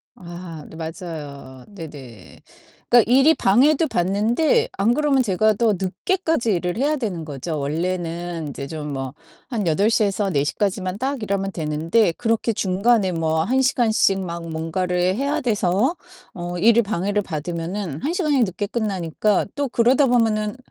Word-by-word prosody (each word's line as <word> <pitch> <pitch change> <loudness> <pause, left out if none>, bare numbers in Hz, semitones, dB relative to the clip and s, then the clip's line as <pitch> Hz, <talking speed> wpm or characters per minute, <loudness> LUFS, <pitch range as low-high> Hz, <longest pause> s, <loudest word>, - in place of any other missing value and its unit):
아 170 -3 -9
네, - - -12
맞아요. 150 -6 -8
네네. 145 - -11 0.5
그러니까 240 -2 +5
일이 270 +5 +6
방해도 285 +10 +3
받는데 230 - +1
안 215 +5 +2
그러면 280 -2 +2
제가 215 +1 +2
더 220 0 +2
늦게까지 320 - 0
일을 175 +1 -2
해야 295 +3 +1
되는 190 -10 -3
거죠. 150 +2 -5
원래는 170 +1 -3
이제 140 0 -6
좀 150 -1 -6
뭐 135 0 -4 0.3
한 225 -7 -2
8 200 +7 +3
시에서 205 -3 +1
4 140 -5 +1
시까지만 185 +3 -2
딱 265 0 -2
일하면 195 -1 -1
되는데 165 +5 +1
그렇게 230 +1 0
중간에 200 +1 +1
뭐 160 -1 0
1 260 +7 +1
시간씩 220 -6 +2
막 170 -2 -6
뭔가를 180 +3 -1
해야 285 +4 -1
돼서 220 - +1 0.4
어 175 0 -5
일을 230 +5 +5
방해를 205 +1 -1
받으면은 170 0 -4
1 320 +4 -1
시간이 305 -7 +1
늦게 200 +1 -3
끝나니까 205 -3 0
또 285 -3 -1
그러다 250 +4 +3
보면은 225 -1 +1
195 Hz, 300 characters per minute, -22 LUFS, 165-235 Hz, 0.5 s, 일이